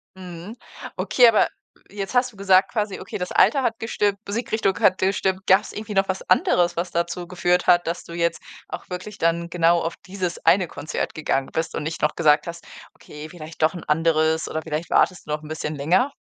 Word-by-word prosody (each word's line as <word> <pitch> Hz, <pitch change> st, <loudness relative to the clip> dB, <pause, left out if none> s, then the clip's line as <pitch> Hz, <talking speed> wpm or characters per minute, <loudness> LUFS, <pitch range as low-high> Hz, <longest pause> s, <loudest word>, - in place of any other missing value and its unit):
Mhm, 180 Hz, +3 st, -9 dB, 0.4 s
okay, 245 Hz, -2 st, +4 dB
aber 225 Hz, -, +4 dB, 0.4 s
jetzt 200 Hz, +4 st, -5 dB
hast 245 Hz, -1 st, +2 dB
du -, -, -19 dB
gesagt 190 Hz, -1 st, +3 dB
quasi 210 Hz, -3 st, -2 dB
okay, 190 Hz, -, -6 dB
das 180 Hz, -1 st, -4 dB
Alter 275 Hz, -, +4 dB
hat 225 Hz, -1 st, -1 dB
gestimmt, 205 Hz, -3 st, 0 dB
Musikrichtung 220 Hz, -2 st, -1 dB
hat 195 Hz, -4 st, +4 dB
gestimmt. 190 Hz, 0 st, 0 dB
Gab's 190 Hz, +2 st, +3 dB
irgendwie 215 Hz, 0 st, -6 dB
noch 195 Hz, 0 st, +1 dB
was 190 Hz, -, -2 dB
anderes, 175 Hz, -1 st, +3 dB
was 175 Hz, +1 st, -3 dB
dazu 175 Hz, +1 st, -2 dB
geführt 180 Hz, 0 st, 0 dB
hat, 175 Hz, 0 st, +5 dB
dass 170 Hz, +1 st, -3 dB
du 170 Hz, -, -11 dB
jetzt 170 Hz, -1 st, -1 dB, 0.3 s
auch -, -, -8 dB
wirklich 180 Hz, +3 st, -7 dB
dann 170 Hz, +1 st, 0 dB
genau 170 Hz, 0 st, +3 dB
auf 165 Hz, -, -3 dB
dieses 185 Hz, -2 st, -4 dB
eine 185 Hz, -2 st, +4 dB
Konzert 155 Hz, -, -4 dB
gegangen 135 Hz, -3 st, -1 dB
bist 160 Hz, 0 st, -2 dB
und -, -, -3 dB
nicht 160 Hz, +2 st, -5 dB
noch 150 Hz, -, +1 dB
gesagt 150 Hz, -1 st, +3 dB
hast: 170 Hz, 0 st, -8 dB, 0.3 s
„Okay, 150 Hz, +1 st, -11 dB
vielleicht 160 Hz, -1 st, -10 dB
doch 155 Hz, +2 st, +3 dB
'n 175 Hz, -, -7 dB
anderes,“ 160 Hz, 0 st, +1 dB
oder 160 Hz, -, -3 dB
vielleicht 160 Hz, +1 st, -4 dB
wartest 185 Hz, -4 st, +2 dB
du -, -, -5 dB
noch 150 Hz, 0 st, -3 dB
'n -, -, -10 dB
bisschen 155 Hz, -1 st, -4 dB
länger? 180 Hz, -, +2 dB
175 Hz, 205 wpm, -23 LUFS, 165-195 Hz, 0.4 s, hat